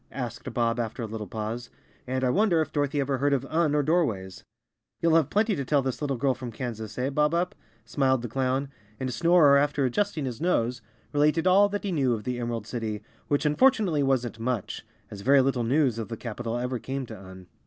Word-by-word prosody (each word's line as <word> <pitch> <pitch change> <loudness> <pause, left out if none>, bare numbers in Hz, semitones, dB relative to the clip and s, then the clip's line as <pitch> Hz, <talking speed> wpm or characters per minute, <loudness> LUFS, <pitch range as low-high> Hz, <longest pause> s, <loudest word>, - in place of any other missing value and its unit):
asked 120 -1 -5
Bob, 120 -1 0
after 115 +1 -3
a - - -2
little 110 -1 -6
pause. 110 +4 -5 0.4
"And 130 +1 -1
I 125 - +3
wonder 195 -2 +3
if 155 - -2
Dorothy 145 -1 0
ever 135 -1 0
heard 140 +1 +2
of 135 -1 0
Un 155 0 +1
or 145 - +2
Doorways?" 125 - 0 0.6
"You'll 165 -1 +2
have 160 -4 +4
plenty 210 0 +2
to 140 - -2
tell 140 +1 +1
this 130 +1 -3
little 140 -3 -1
girl 135 +2 +2
from 125 -1 -7
Kan¬ 120 0 -4
sas, 110 0 -8
eh, 130 +2 -1
Bob 150 +3 +2
Up?" 175 +1 0 0.3
smiled 130 -1 +1
the - - -2
clown, 130 +3 -1 0.3
and 130 -1 -3
Snorer, 165 -2 +5
after 145 -1 +1
adjusting 155 +2 -1
his 125 +1 -5
nose, 125 -8 0 0.3
related 150 +3 +2
all 195 +2 +5
that 205 0 -3
he 200 - -2
knew 135 -7 +2
of 105 - -7
the 125 +1 -3
Em¬ 120 - -2
erald 115 -3 -3
City, 110 -3 -4 0.2
which 145 +1 0
unfortunately 190 - +3
wasn't 125 -4 0
much, 115 -3 -3 0.3
as 100 - -8
very 140 +6 +5
little 130 -2 0
news 125 -1 +2
of 110 - -4
the 115 - -5
capital 115 0 -4
ever 125 0 -2
came 135 +2 -4
to 115 - -9
Un. 95 -2 -12
130 Hz, 220 wpm, -27 LUFS, 120-150 Hz, 0.6 s, Snorer